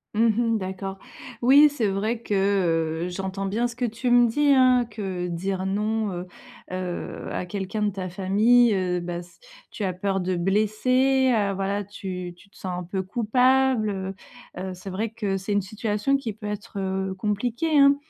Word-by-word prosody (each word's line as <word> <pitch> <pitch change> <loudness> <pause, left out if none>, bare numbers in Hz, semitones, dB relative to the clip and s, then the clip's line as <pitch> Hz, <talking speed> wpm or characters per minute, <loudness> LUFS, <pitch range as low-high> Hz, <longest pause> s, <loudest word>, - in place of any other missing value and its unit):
Mmh 230 +2 +4 0.3
mh, - - +2
d'accord. 190 0 -5 0.5
Oui, 285 +4 +8
c'est 255 -6 -2
vrai 210 +4 -1
que, 210 - -4 0.7
heu, - - -3
j'entends 190 +1 -4
bien 225 +5 0
ce 235 - -9
que 245 0 -1
tu 235 +2 -2
me 240 0 +6
dis 290 +5 +2
hein. 255 -2 +5
Que 190 -4 -4
dire: 190 +2 -2
«Non» 210 +2 0
heu 180 +1 -5 0.4
heu, 185 -1 -4
à 180 - -3
quelqu'un 200 +3 -3
de 205 - +1
ta 185 -1 -5
famille, 210 +5 +4
heu, 180 -2 0
bah 175 0 -4
s 175 0 -14 0.3
tu 210 - -6
as 185 -2 0
peur 195 +1 -1
de 180 0 -1
blesser, 255 +8 +2
heu, 205 -4 +1
voilà. 200 +1 -1
Tu 185 -3 -6
tu 200 +3 -20
te - - -22
sens 185 -2 -4
un - - -5
peu 190 +2 -3
coupable, 250 +3 +2
heu 190 0 -4 0.4
heu, 190 0 -4
c'est 185 +2 -9
vrai 210 +4 -2
que 205 -4 -2
c'est 195 +2 -5
une 205 0 +2
situation 215 +6 -1
qui 230 -6 -5
peut 210 0 -8
être, 205 -1 -5
heu, 190 0 -2
compliquée, 235 +10 -1
hein, 280 0 +7
205 Hz, 190 wpm, -25 LUFS, 190-235 Hz, 0.7 s, Oui